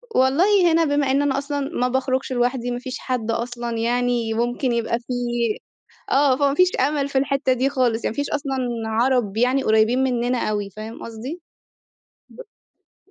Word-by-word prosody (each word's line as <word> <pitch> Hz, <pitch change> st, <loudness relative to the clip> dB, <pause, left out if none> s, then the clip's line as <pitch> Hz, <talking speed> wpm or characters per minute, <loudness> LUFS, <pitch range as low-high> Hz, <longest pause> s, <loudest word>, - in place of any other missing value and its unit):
والله 345 Hz, +8 st, +4 dB
هنا 330 Hz, 0 st, +3 dB
بما 285 Hz, -2 st, +1 dB
إن 275 Hz, +1 st, +2 dB
أنا 275 Hz, -1 st, +1 dB
أصلًا 285 Hz, +1 st, -2 dB
ما 275 Hz, -3 st, -1 dB
باخرجش 260 Hz, +1 st, -1 dB
لوحدي، 245 Hz, 0 st, 0 dB
ما 245 Hz, -, -3 dB
فيش 255 Hz, +1 st, -6 dB
حد 240 Hz, -3 st, -2 dB
أصلًا 235 Hz, 0 st, -3 dB
يعني 240 Hz, -1 st, 0 dB
ممكن 240 Hz, +2 st, -1 dB
يبقى 235 Hz, 0 st, 0 dB
في 250 Hz, +1 st, -6 dB, 1.0 s
آه، 270 Hz, -1 st, +4 dB
فما 280 Hz, -1 st, +2 dB
فيش 365 Hz, +3 st, +4 dB
أمل 280 Hz, +1 st, +1 dB
في 275 Hz, -, -1 dB
الحتة 275 Hz, 0 st, +1 dB
دي 260 Hz, +2 st, +1 dB
خالص، 245 Hz, -4 st, 0 dB
يعني -, -, 0 dB
ما -, -, -17 dB
فيش 285 Hz, 0 st, -2 dB
أصلًا 285 Hz, -2 st, -2 dB, 0.3 s
عرب 225 Hz, -2 st, +1 dB
يعني 255 Hz, +3 st, +2 dB
قريبين 220 Hz, +4 st, +3 dB
مننا 245 Hz, -2 st, 0 dB
أوي 205 Hz, -1 st, -2 dB
فاهم 215 Hz, +3 st, -9 dB
قصدي؟ 245 Hz, +10 st, -7 dB, 1.7 s
ب -, -, -29 dB
255 Hz, 170 wpm, -22 LUFS, 235-275 Hz, 1.7 s, والله